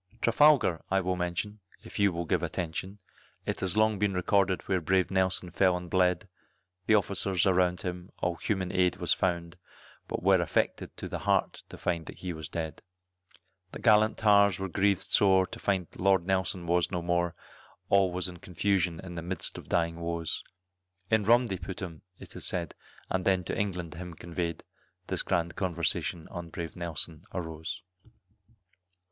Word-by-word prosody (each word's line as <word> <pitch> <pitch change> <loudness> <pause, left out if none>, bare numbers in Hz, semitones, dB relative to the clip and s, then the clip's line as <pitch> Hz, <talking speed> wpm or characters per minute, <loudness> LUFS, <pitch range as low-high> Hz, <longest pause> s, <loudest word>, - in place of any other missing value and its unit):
Trafalgar 115 - +4
I 95 - +3
will 90 -1 -1
mention, 90 +4 -3 0.2
if - - -8
you 100 -1 +4
will 85 0 -3
give - - +1
attention, 90 +4 -4 0.5
It - - -3
long 110 0 +4
has 105 - -5
been 100 -2 +1
recorded 95 +1 +2
where 95 -2 +1
brave 95 +3 +2
Nelson 95 -1 +2
fell 90 +2 +3
and 90 -1 -9
bled, 90 +1 +2 0.6
The 110 - +6
officers 95 -3 +1
around 90 -1 +2
him, 90 0 -5
all 90 - 0
human 95 -2 -2
aid 90 -1 +2
was - - +1
found, 85 -1 -1 0.5
But - - -4
were 95 -1 +5
affected 85 - -1
to - - -5
the - - -4
heart - - +1
to - - -9
find 85 -2 -2
that - - -8
he 90 -2 -4
was 80 -2 -7
dead. 80 -3 -4 0.9
The - - -6
gallant 110 -1 +4
tars 100 -2 +5
were 95 - -3
grieved 100 +1 +1
sore 95 -2 +5
to - - -9
find 95 -3 0
Lord 95 -2 +3
Nelson 95 -2 0
was 85 0 +2
no 90 -2 -3
more, 85 0 0 0.5
All 95 -2 +4
was 90 +1 -1
in 90 -1 -9
confusion 90 -1 0
in 90 -2 -8
the 85 - -5
'midst 90 +1 -1
of - - -14
dying 85 -1 +1
woes, 85 -1 -2 0.7
In 110 -2 +3
rum 120 +3 +5
they 95 -5 -4
put 95 - -6
him, 85 -4 -7 0.2
it - - -13
is - - 0
said, 85 -3 -2 0.4
and 95 -1 0
then 95 -1 +2
to - - -3
England 90 -6 -2
him 90 0 -8
conveyed, 85 0 -4 0.4
This - - -2
grand 85 0 -1
conversation 85 -2 -1
on 85 -2 -7
brave 85 0 -6
Nelson 85 -2 -1
arose. 85 +3 -5
90 Hz, 175 wpm, -29 LUFS, 85-95 Hz, 0.9 s, The